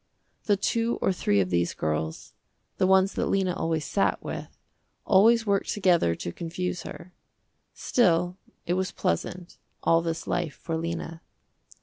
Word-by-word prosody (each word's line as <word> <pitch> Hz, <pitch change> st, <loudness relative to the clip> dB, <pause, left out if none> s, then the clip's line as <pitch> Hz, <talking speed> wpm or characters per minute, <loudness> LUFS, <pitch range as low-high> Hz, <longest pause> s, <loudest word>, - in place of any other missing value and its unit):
The 205 Hz, -2 st, +3 dB
two 230 Hz, +4 st, 0 dB
or 190 Hz, -, +1 dB
three 100 Hz, -, +1 dB
of 90 Hz, -1 st, -2 dB
these 85 Hz, 0 st, +1 dB
girls, 80 Hz, +1 st, -3 dB, 0.4 s
the 185 Hz, -, +3 dB
ones 190 Hz, +1 st, +4 dB
that -, -, -1 dB
Lena 190 Hz, -2 st, +1 dB
always 160 Hz, -3 st, -1 dB
sat 200 Hz, -, 0 dB
with, -, -, -7 dB, 0.5 s
always 225 Hz, +4 st, +5 dB
worked 200 Hz, -2 st, +1 dB
together 175 Hz, -, +2 dB
to 85 Hz, -, -5 dB
confuse 175 Hz, -, -4 dB
her. 180 Hz, +1 st, -10 dB, 0.6 s
Still 180 Hz, -6 st, +2 dB, 0.3 s
it 175 Hz, -, 0 dB
was 185 Hz, 0 st, -1 dB
pleasant, 175 Hz, -, -3 dB, 0.2 s
all 165 Hz, 0 st, +4 dB
this 165 Hz, 0 st, -3 dB
life 175 Hz, -4 st, -2 dB
for 165 Hz, -, -4 dB
Lena. 165 Hz, 0 st, -4 dB
175 Hz, 145 wpm, -27 LUFS, 160-190 Hz, 0.6 s, always